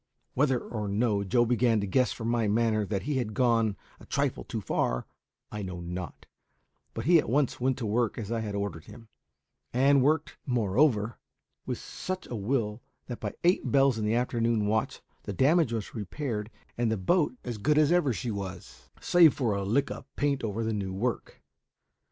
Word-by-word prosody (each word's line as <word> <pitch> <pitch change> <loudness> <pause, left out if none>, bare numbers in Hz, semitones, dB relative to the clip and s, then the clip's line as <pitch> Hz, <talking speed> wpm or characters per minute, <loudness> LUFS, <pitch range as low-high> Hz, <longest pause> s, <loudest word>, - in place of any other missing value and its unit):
Whether 135 -1 +2
or 110 -3 -5
no 100 0 +1
Joe 120 +5 +2
began 120 -1 +2
to 100 - -1
guess 125 +6 +2
from 115 - -5
my 115 -2 +1
manner 110 -1 +1
that 100 -2 -2
he 145 -1 -1
had 110 -5 -2
gone 115 -5 +2 0.2
a - - -14
trifle - - -1
too - - -4
far, - - -1 0.5
I 105 - -5
know 95 -2 -5
not; 90 +1 -6 0.7
but - - -4
he 170 +1 +6
at - - -2
once 135 +1 +1
went 130 +1 +1
to 125 - -4
work 115 +1 0
as 110 -1 -5
I 115 - 0
had 105 -2 -4
ordered 100 -6 -4
him, 115 -2 -13 0.6
and 135 +2 +4
worked, 150 +3 +1
moreover, 115 -1 +1 0.5
with - - -2
such 185 0 -6
a 120 - -6
will 110 0 -1 0.2
that 120 - -6
by 105 - -4
eight 175 +2 +2
bells 135 -4 +4
in - - -2
the 105 +2 +1
afternoon 115 -3 +1
watch 110 +1 -1 0.2
the 100 - -5
damage 145 - +3
was 110 -3 -4
repaired 110 0 -4 0.3
and 120 -2 +2
the 110 - 0
boat 145 - +1
as 120 -3 -5
good 150 +7 +2
as 155 0 +4
ever 175 -6 +3
she 120 +1 -3
was, 95 -3 -7
save 170 -4 +5
for 120 -6 0
a 100 0 -2
lick 120 +8 +1
of - - -7
paint 140 -3 0
over 110 +1 -2
the 110 0 -1
new 95 -3 -3
work. 115 +4 -3
115 Hz, 195 wpm, -28 LUFS, 105-130 Hz, 0.7 s, he